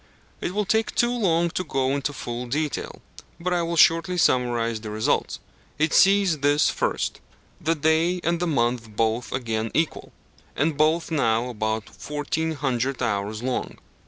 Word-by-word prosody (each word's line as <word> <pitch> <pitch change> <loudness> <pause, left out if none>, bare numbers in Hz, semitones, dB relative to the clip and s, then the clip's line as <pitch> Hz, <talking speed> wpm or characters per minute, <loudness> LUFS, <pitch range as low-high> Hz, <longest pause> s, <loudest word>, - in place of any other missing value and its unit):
It 180 - -3
will 210 0 +1
take 220 +4 0
too 240 0 +3
long 170 -6 +1
to 185 - -2
go 135 -5 0
into 140 0 -1
full 125 -2 -5
detail: 150 +4 -3 0.4
but 180 +1 -1
I 175 - +1
will 170 0 -2
shortly 165 +3 +4
summarize 120 -6 +1
the 110 - -6
results. 110 +1 0 0.4
It 155 +2 +1
sees 195 -5 +4
this 145 +1 +3
first - - -2 0.4
the 165 +1 +2
day 160 +4 +2
and 170 0 0
the 175 - 0
month 120 -6 -1
both 115 +2 0
again 115 -3 -2
equal, 160 0 -1 0.4
but 150 +3 +1
both 155 +3 +1
now 120 -5 +1
about 110 -1 -2 0.2
1,400 145 -4 -2
hours 105 0 -2
long. 130 0 -3
145 Hz, 155 wpm, -24 LUFS, 120-165 Hz, 0.4 s, shortly